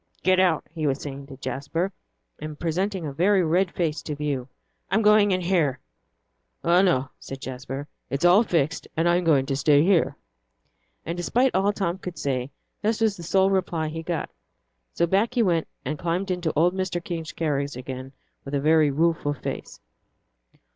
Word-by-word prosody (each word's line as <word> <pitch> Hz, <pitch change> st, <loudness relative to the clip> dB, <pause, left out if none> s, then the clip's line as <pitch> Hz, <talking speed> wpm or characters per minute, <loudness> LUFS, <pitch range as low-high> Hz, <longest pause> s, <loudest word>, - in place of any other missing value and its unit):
"Get 185 Hz, 0 st, +4 dB
out," 180 Hz, -4 st, +3 dB
he 160 Hz, -2 st, -2 dB
was 135 Hz, 0 st, 0 dB
saying 140 Hz, -1 st, -7 dB
to 135 Hz, -2 st, -10 dB
Jasper, 155 Hz, +8 st, -2 dB, 0.5 s
and 155 Hz, -1 st, -7 dB
presenting 180 Hz, +2 st, -1 dB
a 145 Hz, -, -4 dB
very 185 Hz, +5 st, +3 dB
red 175 Hz, +3 st, +2 dB
face 165 Hz, -3 st, -2 dB
to 150 Hz, -, -5 dB
view. 140 Hz, -4 st, -2 dB, 0.4 s
"I'm 220 Hz, +4 st, +2 dB
going 210 Hz, -1 st, +6 dB
in 185 Hz, -1 st, +1 dB
here." 170 Hz, -7 st, +1 dB, 0.9 s
"Oh, 175 Hz, +2 st, +5 dB
no," 140 Hz, -9 st, +2 dB
said 135 Hz, -, -8 dB
Jasper; 135 Hz, +2 st, -6 dB, 0.2 s
"it's 140 Hz, +6 st, -1 dB
all 180 Hz, +4 st, +7 dB
fixed, 165 Hz, -, 0 dB
and 165 Hz, +1 st, +2 dB
I'm 175 Hz, +1 st, +3 dB
going 145 Hz, -5 st, +3 dB
to 135 Hz, -, -1 dB
stay 145 Hz, +1 st, +4 dB
here." 180 Hz, -2 st, +2 dB, 0.9 s
And 170 Hz, -, -3 dB
despite 245 Hz, +9 st, +1 dB
all 195 Hz, +2 st, +3 dB
Tom 190 Hz, -3 st, -2 dB
could 180 Hz, -2 st, -7 dB
say, 130 Hz, -2 st, -2 dB, 0.3 s
this 220 Hz, +1 st, 0 dB
was 220 Hz, -3 st, +2 dB
the 175 Hz, -, -10 dB
sole 190 Hz, +3 st, +2 dB
reply 175 Hz, -5 st, 0 dB
he 160 Hz, +1 st, -5 dB
got. 165 Hz, -1 st, -3 dB, 0.6 s
So 170 Hz, -, +1 dB
back 200 Hz, +8 st, +1 dB
he 240 Hz, -, +4 dB
went, 170 Hz, -5 st, +1 dB, 0.2 s
and 150 Hz, +3 st, -3 dB
climbed 180 Hz, +3 st, -1 dB
into 180 Hz, -3 st, -1 dB
old 170 Hz, +4 st, +3 dB
Mr. 185 Hz, -2 st, -2 dB
King's 165 Hz, -3 st, -4 dB
carriage 145 Hz, -5 st, -1 dB
again, 130 Hz, +1 st, -7 dB, 0.3 s
with 140 Hz, +1 st, -4 dB
a -, -, +2 dB
very 155 Hz, +1 st, +4 dB
rueful 155 Hz, 0 st, +1 dB
face. -, -, -6 dB
165 Hz, 180 wpm, -25 LUFS, 145-185 Hz, 0.9 s, all